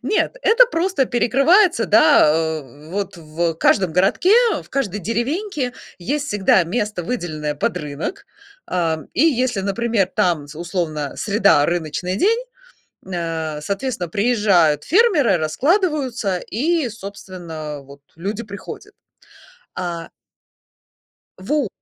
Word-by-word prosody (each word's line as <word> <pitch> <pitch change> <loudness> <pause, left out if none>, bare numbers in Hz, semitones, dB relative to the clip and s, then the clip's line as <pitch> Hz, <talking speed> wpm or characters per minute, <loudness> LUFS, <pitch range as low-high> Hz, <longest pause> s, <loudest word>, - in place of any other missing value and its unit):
нет, 465 +3 0
это 475 +2 +6
просто 350 - 0
перекрывается, 275 - +3
да, 205 -6 +6 0.4
а, 145 +3 -14
вот 195 -1 -4
в 165 +1 -2
каждом 180 +1 +2
городке, 195 - +3 0.3
в - - -20
каждой 210 -7 -2
деревеньке 255 - -2 0.3
есть 285 +10 -2
всегда 195 -4 +3
место, 205 0 -2
выделенное 155 -8 -3
под 145 - -1
рынок. 155 - -5 0.4
А, 165 -3 -1
и 270 - +2
если, 255 -8 +1
например, 205 0 0
там, 165 -5 +1
з 150 - -12
условно, 165 -5 -3
среда- 200 -8 +3
рыночный 175 +2 -2
день, 445 - +2 0.7
м, 190 - -10
а, 160 -3 -3
соответственно, 200 - -3
приезжают 200 - +2
фермеры, 330 - +3
раскладываются, 255 - 0
и, 295 - -1
собственно, 180 -7 -8
а, - - -11
вот 140 +1 -15
люди 200 +7 -4
приходят. 200 -1 -9 0.8
А 170 -2 -4 1.3
Во 265 +4 -1
200 Hz, 120 wpm, -20 LUFS, 165-260 Hz, 1.3 s, это